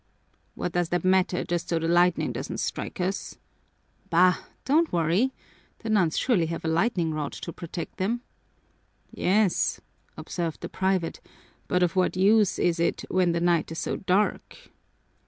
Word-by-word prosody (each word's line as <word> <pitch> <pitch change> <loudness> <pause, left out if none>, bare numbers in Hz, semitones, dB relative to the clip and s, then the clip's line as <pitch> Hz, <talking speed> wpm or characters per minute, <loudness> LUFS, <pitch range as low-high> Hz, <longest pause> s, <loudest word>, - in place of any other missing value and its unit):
"What 180 - -3
does 175 -1 0
that 175 +1 -1
matter 185 -1 +2
just 175 -1 -3
so 170 - +1
the 165 0 -1
lightning 175 +1 +3
doesn't - - -5
strike - - -4
us?" 185 +2 -3 0.7
"Bah, 180 +2 +5 0.3
don't 315 +5 +3
worry! 175 +10 +2 0.5
The 225 - -2
nuns 185 -7 +2
surely 195 -11 +2
have 165 0 -5
a - - 0
lightningrod 160 -4 0
to 170 - -6
protect 170 -1 -7
them." 225 +6 -1 0.9
"Yes," 195 0 +1 0.4
observed 170 -3 -4
the - - -5
private, 190 -3 -1 0.5
"but 180 0 +2
of 175 0 0
what 185 0 +1
use 205 +1 +4
is 170 -1 +1
it 170 - 0
when 180 -2 +2
the 170 - 0
night 170 -2 +1
is 165 - -5
so - - -2
dark?" 195 +2 -1
180 Hz, 155 wpm, -26 LUFS, 170-190 Hz, 0.9 s, Bah